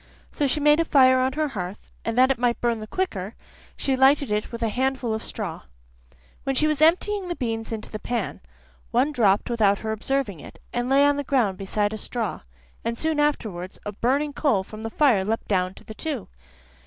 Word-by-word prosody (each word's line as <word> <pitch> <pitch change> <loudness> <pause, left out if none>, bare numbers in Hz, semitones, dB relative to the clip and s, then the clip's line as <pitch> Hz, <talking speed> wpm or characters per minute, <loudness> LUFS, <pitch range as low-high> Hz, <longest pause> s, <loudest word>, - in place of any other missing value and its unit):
So 290 - 0
she 275 - 0
made 295 +1 +5
a - - +4
fire 260 -4 +5
on 260 +1 +1
her 305 +1 0
hearth, 190 -5 -6
and 230 +1 -2
that 260 +1 +6
it 260 - -1
might 240 -1 +1
burn 235 -2 0
the 215 - -7
quicker, 215 - -3 0.4
she 270 - 0
lighted 265 -1 +4
it 210 0 -1
with 235 0 -5
a 225 - +2
handful 255 0 -1
of 220 - -2
straw. 195 -7 -5 0.8
When 270 - -1
she 305 - +3
was 305 -1 0
emptying 370 +4 +3
the 350 - -3
beans 225 -5 -3
into 220 -1 -5
the 215 - -5
pan, 235 -1 -3 0.5
one 260 +5 +2
dropped 210 -7 +3
without 215 -4 +3
her 220 - -1
observing 220 - -2
it, - - -12 0.2
and 245 +1 -1
lay 275 +1 +5
on 285 0 +3
the 285 - -1
ground 235 -9 +1
beside 205 +2 -1
a 215 - -5
straw, 230 -2 -3 0.4
and 230 0 -2
soon 315 +1 0
afterwards 210 -12 -1
a 205 - -3
burning 275 +8 0
coal 255 -11 +1
from 215 +3 -10
the 225 - -4
fire 235 -6 +3
leapt 220 +3 -2
down 185 -2 0
to - - -14
the 220 - -9
two. 275 -2 -4
240 Hz, 215 wpm, -24 LUFS, 215-280 Hz, 0.8 s, that